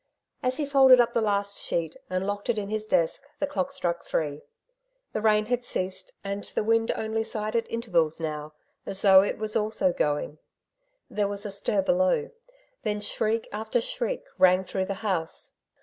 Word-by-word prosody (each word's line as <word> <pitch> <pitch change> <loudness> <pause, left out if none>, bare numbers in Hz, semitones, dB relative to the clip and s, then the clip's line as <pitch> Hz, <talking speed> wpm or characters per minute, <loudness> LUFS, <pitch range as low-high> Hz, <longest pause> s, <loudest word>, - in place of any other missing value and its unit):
As 255 -1 0
he 300 - 0
folded 265 -2 +7
up 235 0 +3
the 230 - +2
last 200 -1 0
sheet, 165 -2 -2
and 185 +1 -1
locked 205 +2 -3
it 235 - +2
in 200 -1 -3
his 215 0 -2
desk, 165 -6 +2 0.2
the 290 - 0
clock 275 -1 -2
struck 175 -11 -2
three. 150 -2 -2 0.7
The 215 - -1
rain 215 -1 +3
had 245 +2 -1
ceased, 185 -4 -3
and 200 0 -4
the - - +1
wind 225 +1 +2
only 220 0 -1
sighed 215 -1 -3
at 230 - 0
intervals 175 -10 0
now, 155 -1 -4 0.3
as 195 0 -2
though 190 -2 +8
it 200 - -1
was 215 0 -2
also 215 -4 +1
going. 150 0 -1 0.7
There 205 -1 0
was 200 +1 -4
a 205 - -3
stir 195 0 +1
below; 185 - +2 0.5
then 210 -3 -1
shriek 220 +2 0
after 220 - -1
shriek - - -2 0.2
rang 185 0 +5
through 190 0 -2
the 195 - -3
house. 175 -5 -2
210 Hz, 180 wpm, -27 LUFS, 185-225 Hz, 0.7 s, though